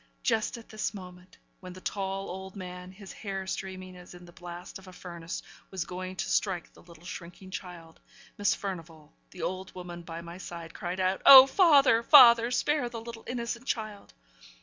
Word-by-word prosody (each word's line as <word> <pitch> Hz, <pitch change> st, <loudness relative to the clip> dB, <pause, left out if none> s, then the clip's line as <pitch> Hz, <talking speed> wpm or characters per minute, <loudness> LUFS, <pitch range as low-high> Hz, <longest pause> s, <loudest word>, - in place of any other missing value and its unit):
Just 225 Hz, 0 st, 0 dB
at 230 Hz, -, -14 dB
this 215 Hz, 0 st, -3 dB
moment 180 Hz, -1 st, -12 dB, 0.2 s
when 185 Hz, -2 st, -10 dB
the 185 Hz, -, -11 dB
tall 195 Hz, 0 st, -3 dB
old 190 Hz, +1 st, -8 dB
man, 180 Hz, -1 st, -8 dB
his 195 Hz, 0 st, -11 dB
hair 195 Hz, -2 st, -5 dB
streaming 185 Hz, -1 st, -6 dB
as 180 Hz, 0 st, -13 dB
in 175 Hz, 0 st, -13 dB
the 175 Hz, -, -14 dB
blast 175 Hz, +2 st, -9 dB
of 190 Hz, -, -16 dB
a -, -, -10 dB
furnace, 170 Hz, -2 st, -7 dB, 0.3 s
was 185 Hz, -3 st, -4 dB
going 185 Hz, +1 st, -6 dB
to -, -, -3 dB
strike 185 Hz, -4 st, -1 dB
the -, -, -18 dB
little 170 Hz, -1 st, -17 dB
shrinking 185 Hz, 0 st, -9 dB
child 170 Hz, -3 st, -9 dB, 0.4 s
Miss 205 Hz, -, +1 dB
Furnivall, 165 Hz, -5 st, -8 dB, 0.2 s
the 180 Hz, -, -9 dB
old 185 Hz, 0 st, -4 dB
woman 175 Hz, -1 st, -8 dB
by 165 Hz, 0 st, -8 dB
my 170 Hz, +1 st, -10 dB
side, 170 Hz, -2 st, -8 dB
cried 180 Hz, -1 st, -5 dB
out, 185 Hz, +1 st, 0 dB
'Oh 265 Hz, -1 st, +12 dB
father! 280 Hz, -, +5 dB
father! 235 Hz, -3 st, +8 dB
spare 250 Hz, 0 st, 0 dB
the 235 Hz, -1 st, -6 dB
little 230 Hz, 0 st, -9 dB
innocent 235 Hz, +1 st, -4 dB
child!' 215 Hz, -6 st, -4 dB
185 Hz, 185 wpm, -29 LUFS, 175-215 Hz, 0.4 s, Oh